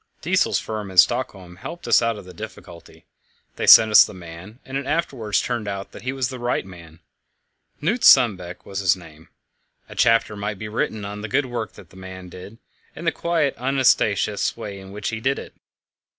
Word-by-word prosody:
Diesel's - - +2
firm 110 -3 -5
in 95 - -10
Stockholm 90 0 +2
helped 170 - -8
us - - +5
out 115 -1 0
of 100 - -11
the 90 - -12
difficulty; 85 -4 -11 0.5
they - - -3
sent 110 -1 +9
us 105 - +9
the 105 - -8
man, 90 +5 -11
and 130 - -8
it 135 -1 -3
afterwards 125 -10 -1
turned 105 -3 -3
out 100 -1 -5
that - - -11
he 130 - -3
was 130 -2 -2
the 130 -2 -7
right 120 -5 -1
man. 85 -3 -14 0.8
Knut 210 +11 -1
Sundbeck 95 -9 +4
was 100 -1 -5
his 95 -2 +3
name. 80 -3 -15 0.6
A - - -11
chapter 115 -2 +2
might 105 0 -4
be 110 - -6
written 105 -1 -3
on 105 +1 -6
the 105 - -5
good 145 +6 +1
work 120 -3 -5
that 90 - -16
man 95 -1 -10
did, 90 +5 -11 0.4
and 165 - -8
the 165 - +3
quiet, 160 -6 0
unostentatious 125 -7 +1
way 100 -4 -7
in 95 0 -12
which 105 0 -4
he 115 - -4
did 135 +4 0
it. - - -9
105 Hz, 195 wpm, -22 LUFS, 95-125 Hz, 0.8 s, sent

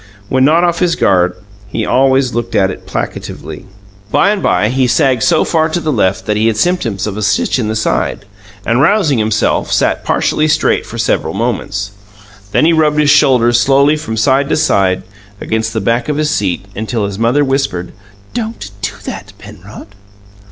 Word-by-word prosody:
When 130 0 +2
not 160 +5 +4
off 170 -1 +1
his 175 -2 +1
guard, 90 -2 +2 0.3
he - - -3
always 130 -1 +2
looked 120 0 -3
at 95 -1 +2
it - - -11
placatively. - - -6 0.4
By 200 - +3
and 210 -2 -2
by, 105 - +1
he 130 +1 +1
sagged 130 -3 +2
so 165 +4 +3
far 160 -1 +1
to 175 - -1
the 155 -2 -2
left 100 -7 0
that 105 - 0
he 110 +2 +1
had 110 -2 0
symptoms 115 - 0
of 105 -1 -4
a - - -3
"stitch 105 +4 +1
in 110 - -1
the 110 - -2
side", 100 - -1 0.4
and, 120 +3 +2
rousing 160 - +2
himself, 110 0 0
sat - - +1
partially 155 - +1
straight 150 - +1
for - - -8
several - - -1
moments. 100 -3 -3 0.6
Then 155 - +2
he 165 - +4
rubbed 155 -2 +2
his 150 -1 +4
shoulders 120 -4 +4
slowly 140 +4 +3
from 130 -8 -5
side 135 +4 +2
to - - +1
side 95 -12 +1 0.4
against 110 0 -2
the 110 - -2
back 115 +5 -1
of 150 - -1
the 155 - 0
seat, 100 - -1
until 110 0 -2
his 100 0 -5
mother 125 +6 +2
whispered, 135 -10 -2 0.4
"Don't 225 - -5
do 95 -1 -3
that, - - -7
Penrod." 100 +2 -13
120 Hz, 185 wpm, -14 LUFS, 105-150 Hz, 0.6 s, not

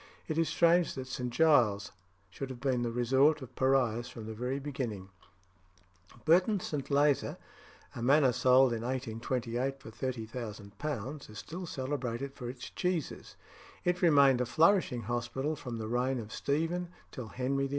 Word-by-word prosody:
It 155 0 -1
is 165 - +2
strange 170 0 +3
that 130 -1 -5
St. 125 -1 -4
Giles's 120 -9 +3 0.4
should 135 +6 -6
have 130 -2 -7
been 130 -2 0
the 120 - 0
resort 135 +5 +3
of 130 - -12
pariahs 125 -3 +2
from 115 -3 -9
the 110 - -5
very 125 +4 -2
beginning. 125 -9 -4 1.2
Burton 185 +6 +4
St. 145 -5 -4
Lazar 145 0 +2 0.6
(a - - -5
manor 135 +2 +5
sold 130 +1 +5
in 115 - -3
1828 125 +1 -2
for 115 - -11
£30,000) 115 +2 -5
is 110 - -10
still 175 +2 -6
celebrated 135 -2 -3
for 125 -3 -6
its 125 0 -8
cheeses. 180 -4 -3 0.5
It 180 0 0
remained 140 -7 +5
a 125 - 0
flourishing 160 - +3
hospital 120 +6 -2
from 125 -5 -6
the 110 -1 -4
reign 125 +3 0
of 110 -2 -6
Stephen 165 +5 -1 0.2
till 125 -4 -7
Henry 135 +3 -1
VIII. - - -12
130 Hz, 155 wpm, -31 LUFS, 120-145 Hz, 1.2 s, manor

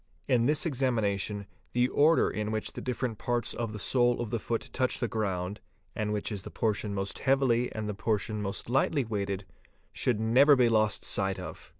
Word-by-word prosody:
In 120 -2 +3
this 150 +2 +2
examination 110 - 0 0.3
the 125 +1 +3
order 155 +5 +4
in 105 0 -2
which 110 0 -3
the - - -6
different 125 -3 -3
parts 120 -2 -1
of 115 -2 -3
the 105 - -6
sole 120 +3 +2
of 120 -3 -3
the 115 - 0
foot 115 +1 -3
touch 130 -1 0
the 120 - 0
ground, 100 -3 -2 0.3
and 110 -2 -1
which 105 +1 -2
is 100 -2 -3
the - - -8
portion 105 -2 -1
most 95 0 -3
heavily 130 -3 +2
and 110 -1 -4
the 105 - -2
portion 105 0 -1
most 100 0 -3
lightly 135 +2 +1
weighted, 100 -3 -3 0.5
should 120 -4 0
never 130 +7 +6
be 125 -3 +4
lost 110 -2 +2
sight 95 -1 0
of. - - -8
110 Hz, 195 wpm, -29 LUFS, 105-125 Hz, 0.5 s, never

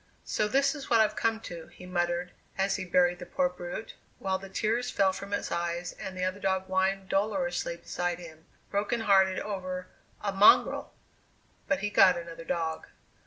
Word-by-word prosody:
"So 210 - 0
this 275 +5 +3
is 285 -3 -8
what 230 - +5
I've 215 -1 +3
come 225 +1 +1
to!" 170 -5 -8
he 180 - -13
muttered 175 0 -1 0.3
as 195 +1 +1
he 195 - -4
buried 175 0 +3
the 180 - -8
poor 180 -1 +1
brute, 180 +4 -7 0.2
while 190 -1 -1
the 195 0 -10
tears 230 +5 0
fell 195 -4 +2
from 200 +1 -7
his 205 - -2
eyes 170 +1 -2
and 190 -3 -7
the 180 - -2
other 185 +2 -2
dog 190 -1 0
whined 190 +1 0
dolorously 215 -2 0
beside 175 0 -2
him 160 -2 -12 0.2
"broken 210 +4 0
hearted 190 -3 +4
over 185 -3 -4 0.3
a 200 - -2
mongrel!" 195 +2 +5 0.7
But 195 -1 +1
he 205 0 -1
got 185 -2 +6
another 170 -1 -8
dog! 160 -1 -2
190 Hz, 180 wpm, -29 LUFS, 175-205 Hz, 0.7 s, got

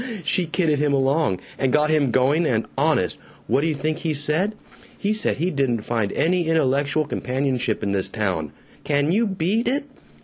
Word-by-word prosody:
she 175 +2 +1
kidded 160 -3 +1
him 145 -1 +1
along, 135 - +1 0.2
and 135 -2 +1
got 150 +2 +3
him 150 -4 +2
going, 135 +7 +2
and 115 -8 0
honest, 140 - +1 0.3
what 140 - +1
d'you 160 0 0
think 155 +2 -2
he 160 -3 -1
said? 155 +9 0 0.4
He 205 +1 0
said 215 - +1
he 175 +5 0
didn't 130 -6 0
find 110 -4 -1
any 175 0 +1
intellectual 145 -1 +1
companionship 130 -4 -1
in 100 - -1
this 95 -1 +1
town. 90 -8 -2 0.3
Can 145 +1 +1
you 220 +5 +2
BEAT 195 +5 0
it? 275 +4 0
145 Hz, 175 wpm, -22 LUFS, 130-165 Hz, 0.4 s, got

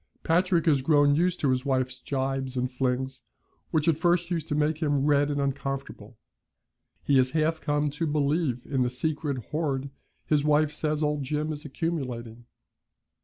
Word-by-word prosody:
Patrick 175 0 +2
has 145 -5 +3
grown 145 0 +4
used 175 +4 +1
to 140 - +3
his 130 0 0
wife's 130 -2 -1
gibes 135 -1 -2
and 125 +1 -1
flings, 130 +1 -2 0.5
which 155 0 0
at 160 -2 +3
first 175 +1 +2
used 165 -3 -2
to 150 - -1
make 150 +1 +1
him 145 -4 +1
red 145 -1 +3
and 145 -1 -1
uncomfortable. 135 0 -4 0.9
He 140 - +3
has 130 0 +4
half 160 +1 +1
come 145 0 0
to 160 +3 -2
believe 145 -3 0
in 135 -2 -1
the 125 - +2
secret 145 +2 -2
hoard 140 -3 -1 0.3
his 150 -2 +2
wife 150 0 +3
says 150 0 -1
old 150 -1 0
Jim 150 +3 -2
is 150 +1 -8
accumulating. 125 -7 -4
145 Hz, 170 wpm, -27 LUFS, 135-155 Hz, 0.9 s, grown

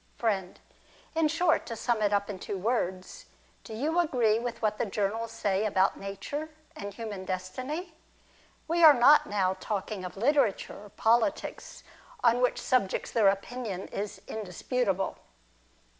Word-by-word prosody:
Friend. 195 -6 -1 0.5
In 320 -1 +3
short, 330 +1 +1
to 230 - -4
sum 235 -1 0
it 205 -1 +2
up 200 0 +1
in 200 -3 -6
two 200 - -4
words, 190 - -2 0.4
do 220 - -8
you 310 +9 0
agree 240 -10 +2
with 235 -1 -4
what 215 -1 0
the - - +1
journals 215 +3 -2
say 205 -3 0
about 195 -3 +2
nature, 285 +11 -5 0.3
and 200 0 -6
human 205 -2 -6
destiny? 255 - -4 0.7
We 335 +1 +2
are 305 -3 +10
not 280 +5 +6
now 190 -2 0
talking 205 -2 -3
of 180 +1 -7
literature 230 -4 +1
or - - -13
politics, 230 +7 0 0.4
on 240 0 +4
which 250 - +2
subjects 245 -7 0
their 220 -4 +4
opinion 200 0 -2
is 205 0 -5
indisputable. 200 0 -2
220 Hz, 145 wpm, -29 LUFS, 195-250 Hz, 0.7 s, are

